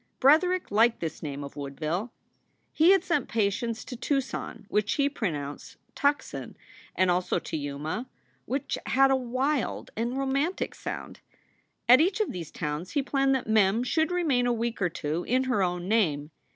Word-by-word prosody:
Bretherick 350 - +4
liked 225 +3 +4
this 165 -2 -4
name 145 -2 -5
of 140 - -9
Woodville. 155 - -3 0.6
He 320 +3 +5
had 390 0 +6
sent 335 -7 0
patients 225 +2 -1
to 250 - -7
Tucson 255 -4 -3
which 210 0 +1
he 280 -1 +2
pronounced 150 - -4 0.2
"Tuckson" 285 +1 -1 0.4
and 185 -1 +3
also 180 +1 +1
to - - -5
Yuma, 150 - -4 0.4
which 265 +2 -2
had 270 +1 +4
a - - +5
wild 260 +2 -1
and 235 +4 -2
romantic 275 +6 -1
sound. - - -6 0.7
At 250 +4 +8
each 370 +5 +1
of 430 - 0
these 170 -4 -6
towns 150 +3 -4
he 285 - +1
planned 270 0 +2
that 260 - -2
Mem 220 +1 +3
should 315 +6 +1
remain 305 -9 +1
a 245 - +2
week 235 -1 -2
or 180 - +2
two 160 +1 -3
in 255 +2 +2
her 255 -6 +1
own 180 -1 -1
name. 160 -9 +1
235 Hz, 165 wpm, -27 LUFS, 175-275 Hz, 0.7 s, At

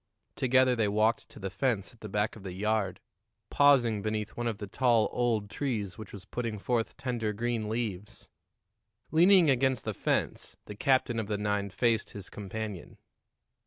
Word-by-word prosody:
Together 130 0 +3
they 110 -3 +1
walked 110 +3 +1
to - - -14
the 95 -2 -5
fence 110 -1 -1
at 120 - -22
the 110 - -8
back 105 +3 -1
of 110 - -11
the 95 -2 -6
yard, 105 +1 -1 0.5
pausing 125 -7 +4
beneath 110 +1 -3
one 120 0 -2
of 115 -3 -2
the 105 - -6
tall 115 +1 +2
old 115 -4 0
trees 105 -6 -3
which 110 -2 -10
was 100 -1 -10
putting 115 0 -4
forth 115 +2 -1
tender 120 -5 -2
green 115 0 -2
leaves. 105 -4 -4 0.8
Leaning 175 +1 +6
against 130 -1 +2
the 110 - -2
fence, - - -2
the 105 - -7
captain 120 +1 +1
of 110 - -3
the 105 -1 -1
nine 105 -1 -1
faced 110 +3 0
his 100 -2 -9
companion. 105 -1 -6
110 Hz, 170 wpm, -29 LUFS, 105-120 Hz, 0.8 s, Leaning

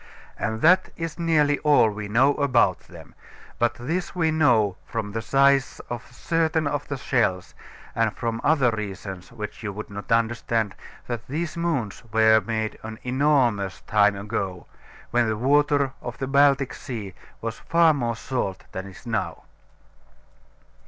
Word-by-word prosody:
And 110 0 -2
that 185 +3 +5
is 165 0 -5
nearly 150 -4 +2
all 145 -7 +4
we 105 0 -6
know 130 +7 +4
about 125 -9 +3
them; - - -14 0.5
but 120 +1 +2
this 165 +10 -3
we 160 -3 +2
know 120 -11 +3
from 110 -3 -4
the 115 +2 -3
size 135 +1 +3
of 120 0 -6
certain 160 -1 0
of 145 0 -2
the 140 - -3
shells, 110 -9 0 0.4
and 115 -1 +1
from 115 +1 -3
other 140 -5 +3
reasons 100 -1 -6
which 105 -3 -7
you 105 -3 -3
would 105 +1 -8
not 100 +2 -8
understand, 115 -2 +1 0.3
that 120 -2 -5
these 155 +3 -3
mounds 155 -12 -2
were 110 0 +5
made 110 -1 -3
an 110 0 -7
enormous 125 -7 +1
time 105 -1 +3
ago, 100 -3 -4 0.5
when 120 -1 +2
the 110 - -1
water 140 +2 +2
of - - -6
the 135 - -3
Baltic 140 -1 +3
Sea 110 -8 -6 0.3
was 115 -1 -5
far 165 -1 +4
more 120 -5 -1
salt 115 -4 -3
than 95 +1 -6
it 95 -1 -12
is - - -17
now. 105 -8 -3
120 Hz, 155 wpm, -24 LUFS, 105-145 Hz, 0.5 s, that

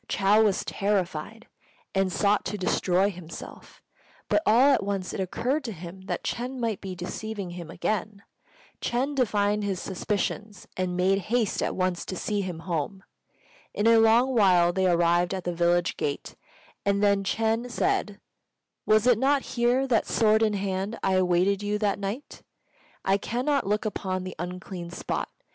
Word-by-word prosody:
Chou 205 +2 +4
was 205 -3 +1
terrified, 200 +1 -2 0.5
and 195 -1 +1
sought 205 +3 +2
to 210 - -3
destroy 185 +1 +1
himself; 170 -3 -11 0.5
but - - +3
all 255 +6 +6
at - - +2
once 195 -2 -3
it - - -4
occurred 250 - -1
to 230 - -3
him 180 0 -9
that - - -3
Ch'êng 250 +2 -3
might 230 -5 -2
be 190 -2 -6
deceiving 195 +2 -5
him 175 -2 -8
again. 210 +2 -3 0.6
Ch'êng 260 +4 -1
divined 210 -5 +1
his 195 -3 -2
suspicions, 205 +1 -3
and 180 -1 -2
made 190 +2 +3
haste 235 -3 +1
at - - -1
once 185 -2 -1
to 185 - -5
see 205 +3 -1
him 180 -4 -5
home. 175 +3 -3 0.7
In 205 - 0
a 230 0 +6
little 230 +4 +4
while 180 -6 +4
they 190 0 +2
arrived 175 +1 +2
at 185 - -5
the 175 - -2
village 175 +1 +1
gate, 145 -1 -3 0.5
and 200 0 +1
then 200 -1 +3
Ch'êng 225 +4 0
said, 210 -3 -1 0.7
"Was 215 +1 +4
it 245 -3 +4
not 275 +1 +2
here 245 +2 +2
that, 235 -4 +2
sword 220 -1 +3
in 215 -2 +2
hand, 195 +2 -2
I 190 - +2
awaited 185 +2 +2
you 205 0 -1
that 205 -2 0
night? 205 +8 -5 0.6
I 195 +1 +3
cannot 255 +4 -1
look 210 +2 0
upon 185 -3 -2
the 185 -1 -6
unclean 180 0 -6
spot. 175 - -3
200 Hz, 165 wpm, -26 LUFS, 185-220 Hz, 0.7 s, all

